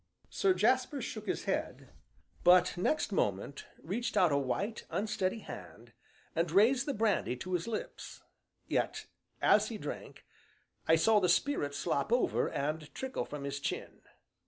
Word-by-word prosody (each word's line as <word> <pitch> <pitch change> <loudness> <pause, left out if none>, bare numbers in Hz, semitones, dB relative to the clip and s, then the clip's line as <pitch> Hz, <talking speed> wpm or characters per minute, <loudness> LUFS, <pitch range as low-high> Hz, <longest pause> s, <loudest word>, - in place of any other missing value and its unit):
Sir 190 -1 +2
Jasper 255 +8 +2
shook 220 -3 -6
his - - -1
head, - - -3 0.5
but 180 0 +6
next 210 - 0
moment 105 - -1 0.2
reached 215 +6 -2
out 180 -5 +5
a - - +3
white, 195 - -2
unsteady 195 +3 -1
hand, 105 - -10 0.4
and 165 +1 +1
raised 235 - +4
the 285 - 0
brandy 210 - +1
to 185 +9 -6
his 175 +2 -1
lips; 225 -2 -6 0.4
yet - - -1 0.4
as - - +5
he - - -5
drank, - - -7 0.6
I 160 - +6
saw 210 +6 +4
the 180 -3 +2
spirit 175 - +1
slop 140 +8 -1
over, 245 +1 +2
and 150 +2 -3
trickle 265 0 -3
from 145 -1 -7
his 140 0 -3
chin. - - -4
185 Hz, 150 wpm, -32 LUFS, 145-225 Hz, 0.6 s, but